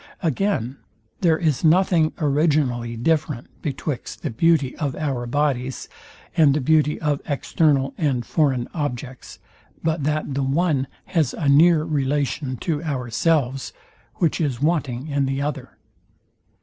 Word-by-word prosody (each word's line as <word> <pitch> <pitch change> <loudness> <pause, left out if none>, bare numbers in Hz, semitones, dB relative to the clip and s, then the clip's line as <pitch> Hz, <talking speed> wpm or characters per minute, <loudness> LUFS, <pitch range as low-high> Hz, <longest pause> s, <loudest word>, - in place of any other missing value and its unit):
Again; 155 - 0 0.4
there 165 -4 +3
is 155 -6 0
nothing 170 -1 +4
originally 140 -6 +1
different 150 -1 0
betwixt 145 -2 -4
the - - -2
beauty 145 +1 +2
of 145 -4 -2
our 135 -5 -2
bodies 130 -1 -1 0.5
and 150 -5 +5
the - - +1
beauty 150 +2 +2
of 150 -2 -1
external 140 -1 +1
and 135 -6 0
foreign 135 -6 +1
objects, 130 -4 -5 0.5
but 160 -2 0
that 150 -1 -1
the 140 - -1
one 140 0 +1 0.2
has 155 -7 0
a 150 - -2
near 155 +3 +5
relation 140 -3 -1
to 155 -3 -1
ourselves, 135 0 0 0.4
which 170 -2 0
is 135 -6 -1
wanting 145 -4 -1
in 140 -2 0
the 135 0 -1
other. 140 -3 -4
145 Hz, 130 wpm, -22 LUFS, 130-155 Hz, 0.5 s, and